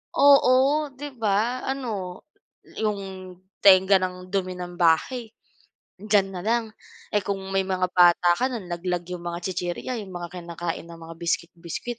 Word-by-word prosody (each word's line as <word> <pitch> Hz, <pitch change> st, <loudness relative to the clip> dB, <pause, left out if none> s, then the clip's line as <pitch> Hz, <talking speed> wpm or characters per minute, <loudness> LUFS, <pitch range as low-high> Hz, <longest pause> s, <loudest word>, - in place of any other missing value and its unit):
Oo, 280 Hz, -2 st, +6 dB, 0.4 s
'di 290 Hz, +2 st, -7 dB
ba, 225 Hz, +3 st, 0 dB
ano, 215 Hz, -9 st, -4 dB, 0.5 s
'yong 195 Hz, -3 st, -4 dB, 0.3 s
tengga 190 Hz, 0 st, +7 dB
ng 180 Hz, 0 st, -4 dB
dumi 185 Hz, -2 st, -1 dB
ng 175 Hz, 0 st, -6 dB
bahay, 220 Hz, +8 st, +2 dB, 0.7 s
diyan 200 Hz, -1 st, +2 dB
na 180 Hz, -, -4 dB
lang, 230 Hz, +1 st, +1 dB, 0.5 s
eh, 205 Hz, -, +3 dB
kung 200 Hz, -1 st, -2 dB, 0.2 s
may 195 Hz, -, +3 dB
mga 185 Hz, -1 st, 0 dB
bata 175 Hz, 0 st, +5 dB
ka, 255 Hz, +1 st, 0 dB
nalaglag 175 Hz, -4 st, -3 dB
'yong 180 Hz, -1 st, -6 dB
mga 170 Hz, 0 st, -3 dB
tsitsirya, 180 Hz, +7 st, -3 dB
'yong 195 Hz, -3 st, -8 dB
mga 175 Hz, -1 st, -5 dB
kinakain 170 Hz, -1 st, -5 dB
na 170 Hz, -, -10 dB
mga 165 Hz, 0 st, -9 dB
biscuit, 170 Hz, 0 st, -1 dB
biscuit. 185 Hz, +8 st, -6 dB
185 Hz, 150 wpm, -25 LUFS, 175-215 Hz, 0.7 s, tengga